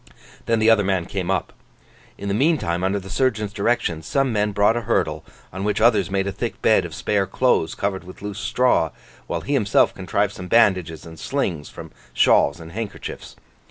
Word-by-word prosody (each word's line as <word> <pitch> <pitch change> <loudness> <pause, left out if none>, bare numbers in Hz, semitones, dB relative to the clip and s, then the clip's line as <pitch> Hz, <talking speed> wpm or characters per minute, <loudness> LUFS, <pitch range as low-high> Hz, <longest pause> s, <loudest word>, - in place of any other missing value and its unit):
Then 115 - +2
the 110 0 +2
other 110 -2 +4
man 95 -3 0
came 95 -1 -4
up. - - -1 0.6
In 100 - -6
the 100 - 0
meantime, 105 - +1
under 95 +2 +1
the 95 - -11
surgeon's 110 0 0
directions, 100 -7 -1
some 135 -3 +1
men 105 0 +1
brought 105 +2 +3
a 120 - -1
hurdle, 110 - -1 0.3
on 95 +2 -4
which 105 0 0
others 110 -5 +3
made 95 0 0
a 100 - -2
thick 115 +4 -4
bed 110 -5 +4
of 80 -2 -7
spare 100 +1 0
clothes 110 -5 +1
covered 100 -1 -2
with 90 +2 -12
loose 105 -1 -5
straw, 125 -8 +2 0.4
while - - -3
he 145 - -3
himself 110 -8 +3
contrived 100 +2 -1
some 90 -2 -8
bandages 90 -8 +2
and 80 -1 -11
slings 90 - -2
from - - -10 0.2
shawls 70 +3 +4
and 80 0 -10
handkerchiefs. 110 +2 -7
100 Hz, 195 wpm, -22 LUFS, 90-115 Hz, 0.6 s, other